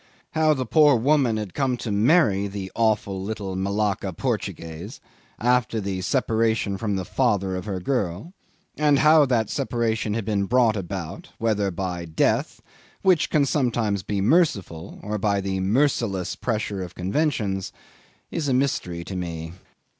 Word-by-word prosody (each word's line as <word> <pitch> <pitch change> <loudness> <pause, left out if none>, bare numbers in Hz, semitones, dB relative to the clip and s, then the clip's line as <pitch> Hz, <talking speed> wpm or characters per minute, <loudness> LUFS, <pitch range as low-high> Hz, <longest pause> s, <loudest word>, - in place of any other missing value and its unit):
How 155 -1 +3
the 130 -1 -2
poor 150 +2 +5
woman 125 -1 +2
had 105 -4 -5
come 130 -3 0
to 115 - -4
marry 105 - +3
the 95 -1 -6
awful 105 -4 0
little 100 -2 -4
Malacca 100 0 -1
Portuguese 85 +5 -4 0.4
after 120 -1 +1
the 95 -2 -3
separation 110 -3 +1
from 105 0 -2
the 95 -1 -3
father 100 -7 0
of 90 - -5
her 100 -3 -3
girl 100 - -2 0.4
and 150 -1 +3
how 155 0 +6
that 115 -4 +1
separation 115 -5 -1
had 115 -3 -2
been 100 -2 0
brought 120 0 +3
about, 95 -2 -5
whether 105 -3 +1
by 90 -1 -4
death, 80 -1 0 0.4
which 185 -5 +3
can 150 - +3
be - - +2
sometimes 115 - 0
merciful, 100 - +1
or 105 +1 -3
by 100 0 +1
the 95 -1 -2
merciless 100 -3 +1
pressure 105 -4 -2
of 90 -1 -7
conventions, 100 - -1 0.6
is 155 -3 -2
a 130 - +2
mystery 90 -10 -1
to 95 - -7
me. 80 -2 -5
105 Hz, 150 wpm, -24 LUFS, 95-125 Hz, 0.6 s, how